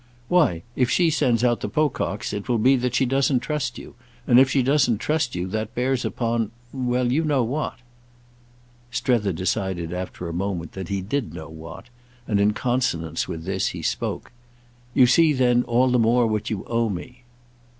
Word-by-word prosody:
"Why 120 - +3
if 125 -2 +2
she 170 +1 +3
sends 125 -6 +1
out 120 -1 +2
the - - -4
Pococks 145 -8 -1
it 105 +2 -5
will 120 - +2
be 130 +5 +4
that 125 -1 -1
she 130 - +3
doesn't 135 0 +2
trust 125 -4 -3
you, - - -10 0.3
and 120 0 +6
if 130 0 +5
she 135 -1 +2
doesn't 130 -4 +3
trust 150 +2 -1
you, 90 0 -2
that 110 +3 -4
bears 125 +1 0
upon—well, 120 +2 -2
you 155 +6 +2
know 145 -5 +2
what." 140 +7 -2 1.1
Strether 120 -4 +1
decided 90 -1 -2
after 90 -1 -5
a 85 - -5
moment 90 -2 -3
that 95 -2 -7
he 100 -1 -1
did 115 +6 -3
know 80 -1 -8
what, 80 +7 -10 0.4
and 105 -2 +1
in 105 +1 +3
consonance 105 - -1
with 80 -1 -6
this 95 +1 -1
he - - -7
spoke. - - -3 0.6
"You 130 - +7
see 155 +5 +5
then 125 -2 +3
all 125 +1 +2
the 125 - +3
more 120 +2 +3
what 110 -1 -1
you 105 -3 -3
owe 115 -1 0
me." 125 +7 -7
120 Hz, 180 wpm, -23 LUFS, 100-130 Hz, 1.1 s, You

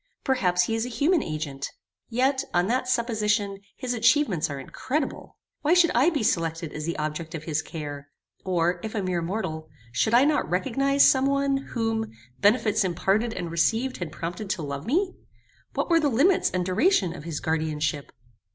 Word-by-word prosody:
Perhaps 180 -10 +2
he 225 - -1
is 225 0 0
a 250 - -4
human 305 +7 +2
agent. 150 -3 -4 0.4
Yet, 260 +3 +1
on 175 0 +3
that 250 +4 0
supposition 210 -5 0 0.2
his 255 -2 -2
atchievements 230 - +2
are 140 -1 -5
incredible. 270 - -4 0.2
Why 305 +4 +3
should 350 -2 +5
I 260 +8 +4
be 295 -9 -1
selected 165 -4 -1
as 155 +1 -5
the 170 - -2
object 155 +2 -4
of 155 - -6
his 155 -1 -1
care; 145 -3 -7 0.3
or, 175 -1 +1
if 220 0 -5
a 205 - -1
mere 180 -2 -1
mortal, 165 -4 -4 0.2
should 130 - +2
I 255 +3 +6
not 300 0 +1
recognize 275 +9 +3
some 265 0 +4
one, 275 0 +1
whom, 225 -4 -2 0.3
benefits 215 0 +3
imparted 195 +6 0
and 175 -2 -4
received 225 +11 +1
had 175 -4 -5
prompted 175 +6 -5
to 170 - -2
love 140 +1 -5
me? 360 +9 +1 0.6
What - - 0
were 335 - +6
the 300 -2 +2
limits 295 +10 +3
and 180 -1 -1
duration 190 - +2
of 160 - -9
his 165 -3 -3
guardianship? 155 -2 -2
205 Hz, 180 wpm, -26 LUFS, 165-255 Hz, 0.6 s, I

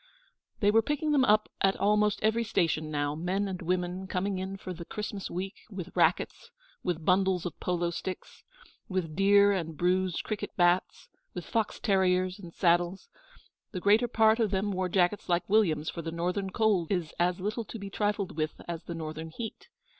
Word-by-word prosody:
They 205 0 +5
were 225 +1 +5
picking 295 +5 -1
them 285 -3 +4
up 215 -3 +4
at 195 0 +3
almost 210 +1 +2
every 220 +2 +2
station 165 -7 0
now 145 -1 -1
men 185 +6 -1
and 185 -2 -5
women 180 +2 -2
coming 190 +1 -1
in 190 +1 -4
for 185 -1 -6
the 170 0 -8
Christmas 205 +1 -5
Week, 190 +3 -4 0.2
with 185 -4 -7
racquets, - - +1 0.3
with 170 -3 -3
bundles 185 -1 +2
of 175 - -5
polo 175 -1 -1
sticks, 185 +2 -6 0.5
with 180 -5 -2
dear 200 +1 +5
and 165 -5 -2
bruised 180 +1 +1
cricket 215 -2 -5
bats, 175 0 +2 0.3
with 180 - -5
fox 225 -2 -1
terriers 185 -2 +2
and 175 -4 -10
saddles. 175 - +1 0.6
The 185 - -2
greater 210 +6 +4
part 220 -1 +4
of 220 -3 +2
them 200 +1 0
wore 185 -1 -1
jackets 180 +2 +1
like 175 0 +1
William's, 170 -8 +2
for 170 - -6
the 165 0 -5
Northern 180 +4 -2
cold 205 -5 +1
is 175 -5 -1
as 180 +1 +1
little 210 +5 -2
to 230 - -7
be 200 -2 -7
trifled 205 -3 -1
with 155 0 -2
as 170 -1 -5
the 170 - -5
Northern 160 0 -5
heat. 225 +7 -7
185 Hz, 185 wpm, -29 LUFS, 175-205 Hz, 0.6 s, They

